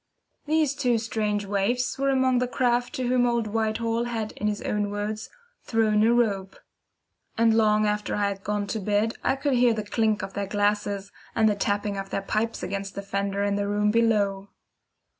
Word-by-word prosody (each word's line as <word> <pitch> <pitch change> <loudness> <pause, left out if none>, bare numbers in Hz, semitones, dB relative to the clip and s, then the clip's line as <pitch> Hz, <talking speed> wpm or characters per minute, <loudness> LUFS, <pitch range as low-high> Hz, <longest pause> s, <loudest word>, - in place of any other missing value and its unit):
These 310 -2 +2
two 245 -4 +1
strange 215 -2 -1
waifs 210 +7 0
were 275 0 +2
among 260 -2 +3
the 250 - 0
craft 245 -1 0
to 255 -1 -2
whom 245 0 +3
old 235 -2 +1
Whitehall 225 +2 -1
had 225 -3 -3
in 210 - -3
his 210 -1 -2
own 210 -1 -1
words, 210 +1 -4 0.3
"thrown 215 -2 +2
a 225 +2 +4
rope"; 200 -5 0 0.8
and 225 0 +4
long 215 -1 +3
after 210 0 -1
I 205 -1 +1
had 195 0 -6
gone 205 0 -1
to 220 +2 -3
bed 210 +3 +1
I - - +2
could 275 0 -1
hear 245 -2 +4
the 215 - -3
clink 215 0 0
of 195 - -6
their 200 -1 -3
glasses, 205 0 -1 0.2
and 220 -1 +4
the 210 - +3
tapping 200 0 -1
of 195 0 -5
their 195 - -2
pipes 220 +3 -2
against 195 +1 -4
the 200 - -5
fender 200 0 -2
in 200 0 0
the 200 0 -1
room 210 +1 +1
below. 205 -4 +1
210 Hz, 195 wpm, -26 LUFS, 205-230 Hz, 0.8 s, a